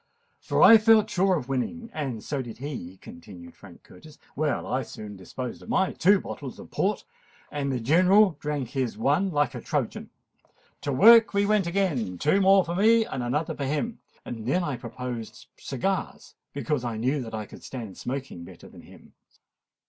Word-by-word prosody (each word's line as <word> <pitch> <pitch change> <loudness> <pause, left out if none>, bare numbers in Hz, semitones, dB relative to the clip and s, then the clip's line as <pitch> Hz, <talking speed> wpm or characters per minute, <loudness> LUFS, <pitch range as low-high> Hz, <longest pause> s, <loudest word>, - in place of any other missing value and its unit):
"For - - +1
I 225 -1 +9
felt 220 -1 +4
sure 190 +1 +2
of 125 -5 -6
winning—and 135 - -4
so 140 -2 -3
did 120 -3 -9
he," 120 - -7
continued 85 0 -12
Frank 95 -4 -15
Curtis. 155 -1 -16 0.2
"Well, 150 0 -1
I 130 +2 -1
soon 105 -4 -9
disposed 120 +6 -7
of - - -13
my 190 -6 +1
two 195 +3 +4
bottles - - -8
of - - -12
Port, - - -1 0.5
and 140 -2 -2
the 130 - -1
General 180 - +4
drank 145 -5 -3
his 130 -5 -3
one 145 - +1
like 145 -6 0
a 120 - -6
Trojan. - - -3 0.7
To 145 - -2
work 225 - +7
we 200 0 +3
went 205 -3 +2
again—two 155 - 0
more 195 0 +5
for 170 - -4
me, 220 +4 +4
and 135 - -5
another 135 +6 -1
for 140 - -3
him. 155 - -2 0.3
Then 120 +10 -2
I 145 -5 -2
proposed 120 -1 -7
cigars, - - -4 0.2
because 145 -2 -2
I 115 -2 -3
knew 130 +5 0
that 115 -2 -6
I 110 -1 -4
could - - -13
stand 115 -7 -7
smoking 130 -9 -6
better - - -13
than - - -14
him. - - -17
140 Hz, 175 wpm, -26 LUFS, 120-185 Hz, 0.7 s, I